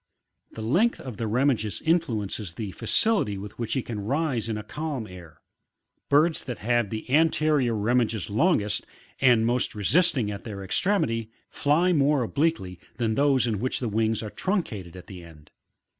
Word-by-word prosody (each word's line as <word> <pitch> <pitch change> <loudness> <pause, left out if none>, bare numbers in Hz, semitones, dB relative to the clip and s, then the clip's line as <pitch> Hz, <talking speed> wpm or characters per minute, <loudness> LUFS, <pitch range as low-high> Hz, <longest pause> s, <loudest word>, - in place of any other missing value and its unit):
The 110 - -6
length 185 - +2
of 125 -6 -8
the 115 - -2
remiges 115 -3 0
influences 110 - -1
the 105 -4 -5
feicility 115 - +1
with 100 +3 -9
which 115 - -2
he 130 - -1
can 110 -3 -5
rise 135 -2 -1
in 110 - -2
a 105 - -6
calm 150 -5 -4
air; 90 -5 -13 0.7
birds 155 +3 +3
that 125 -3 -5
have 120 -1 0
the 110 +1 -5
anterior 155 -5 +3
remiges 110 -1 0
longest, 105 - +1 0.4
and 120 -4 +4
most 120 0 0
resisting 125 - +2
at 100 - -7
their 100 -3 -7
extremity, 115 - 0 0.2
fly 165 +6 +2
more 145 -3 +3
obliquely, 120 - -1 0.2
than 115 -2 0
those 140 +1 +3
in 110 -4 -1
which 130 +4 -1
the 120 - -2
wings 110 +1 0
are 105 - -6
truncated 110 - -3
at 90 - -10
the 90 -3 -10
end. 75 -3 -16
115 Hz, 165 wpm, -26 LUFS, 105-145 Hz, 0.7 s, and